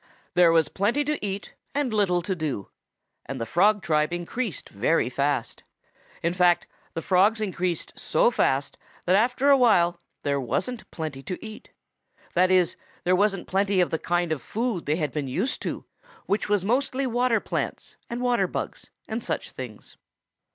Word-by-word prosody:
There 175 -1 +6
was 165 -2 +4
plenty 220 +9 +1
to 295 -3 -2
eat 200 0 -4 0.2
and 280 -5 0
little 180 -5 +2
to 190 +2 -1
do, 150 - -3 0.6
and 135 0 -4
the 115 - -2
Frog 200 - +3
tribe 155 -2 +2
increased 175 - -3
very 125 +4 +1
fast. 140 -3 -1 0.6
In 170 +1 +1
fact, 180 -1 +3 0.3
the 165 - -3
Frogs 200 +4 +4
increased 185 -4 -2
so - - +2
fast - - 0 0.3
that 180 - +4
after 250 +6 +3
a 275 - +7
while 175 -9 +4 0.2
there 140 -1 0
wasn't 240 - -2
plenty 155 -4 -5
to 180 - -6
eat. 220 0 -10 0.6
That 180 +1 +4
is, 185 -2 +3 0.3
there 180 +1 +3
wasn't 195 -1 +1
plenty 195 0 +1
of 180 - +2
the 160 - 0
kind 175 -1 0
of 155 - -1
food 225 - -2
they 150 - +2
had 150 -4 -1
been 150 -3 -3
used 190 - -1
to, - - -4 0.4
which 205 +1 0
was 205 -3 +2
mostly 265 +4 +1
water 245 -2 +2
plants, - - -4
and 235 +1 -3
water 245 -1 +2
bugs - - -5 0.2
and 225 +1 -3
such - - -3
things. 120 -5 -9
185 Hz, 170 wpm, -26 LUFS, 165-220 Hz, 0.6 s, a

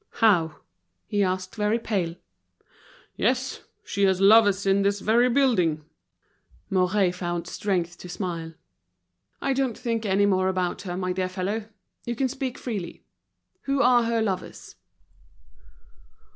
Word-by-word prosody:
"How?" 170 -8 +3 0.6
asked 185 -2 0
he, - - -11
very 210 +2 +2
pale. 190 -7 -2 1.0
"Yes! - - 0 0.2
she 200 0 0
has 190 -1 +2
lovers 200 -1 +5
in 195 0 +3
this 200 +1 +1
very 235 +5 +3
building." 185 - +2 0.9
Mouret 185 0 +2
found 175 -2 -3
strength 175 -2 -2
to 180 - -9
smile. 170 -3 -5 0.9
"I 275 - +1
don't 265 -4 -1
think 230 -2 -2
any 200 -1 +2
more 185 -2 +2
about 185 -2 -1
her, 175 - -3
my 185 -1 -1
dear 185 0 -2
fellow. 200 +4 -3 0.4
You 240 - -3
can 260 +2 0
speak 265 -1 -4
freely. 205 -8 -5 0.6
Who 275 0 +1
are 245 -1 +5
her 230 -1 +1
lovers?" 190 -4 -5
195 Hz, 130 wpm, -25 LUFS, 180-225 Hz, 1.0 s, lovers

